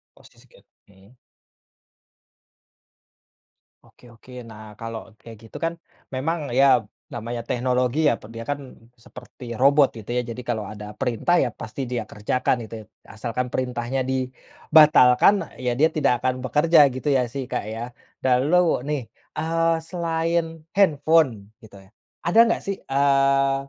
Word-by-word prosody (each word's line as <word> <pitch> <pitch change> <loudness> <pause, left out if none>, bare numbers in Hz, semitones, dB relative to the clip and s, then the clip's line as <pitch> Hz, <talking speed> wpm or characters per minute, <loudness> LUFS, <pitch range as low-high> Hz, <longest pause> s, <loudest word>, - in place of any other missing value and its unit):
Posisi - - -21
ker - - -22 0.2
hmm. 100 +5 -22 2.7
Oke - - -22
oke. 115 +2 -18 0.2
Nah 110 -1 -11 0.2
kalau 115 0 -5 0.2
kayak 115 -1 -12
gitu - - -10
kan 165 0 0 0.4
memang 150 +1 -2
ya 135 - +7 0.5
namanya 120 0 -5
teknologi 125 +1 0
ya, - - +2 0.2
dia 115 0 -6
kan 145 - -3 0.5
seperti 125 +1 -13 0.2
robot 140 +1 +6
gitu 110 -1 -11
ya. - - +2
Jadi 115 +2 -6
kalau 110 -3 -1
ada 105 0 -9
perintah 125 +9 +1
ya - - 0
pasti 115 +4 -6
dia 120 -3 -2
kerjakan 115 +5 0
gitu - - -13
ya, - - -21 0.3
asalkan 120 +3 -3
perintahnya 125 0 -2
dibatalkan 130 +3 +4 0.3
ya 125 - +1
dia 160 +2 +5
tidak 150 -5 +2
akan 130 +1 0
bekerja 155 +5 +3
gitu 130 +3 -6
ya 125 - +2
sih, 140 -1 -3
Kak, - - -2
ya, 115 - -6 0.4
lalu 140 +4 +2
nih, 150 -2 -1 0.4
eee, 165 +1 +1 0.2
selain 170 -1 0 0.3
handphone 160 -5 +4 0.3
gitu 105 -2 -15
ya, 95 - -21 0.4
ada 175 +6 +4
gak - - -1
sih, 195 - -2
eee, 135 0 +2
130 Hz, 140 wpm, -23 LUFS, 120-155 Hz, 2.7 s, ya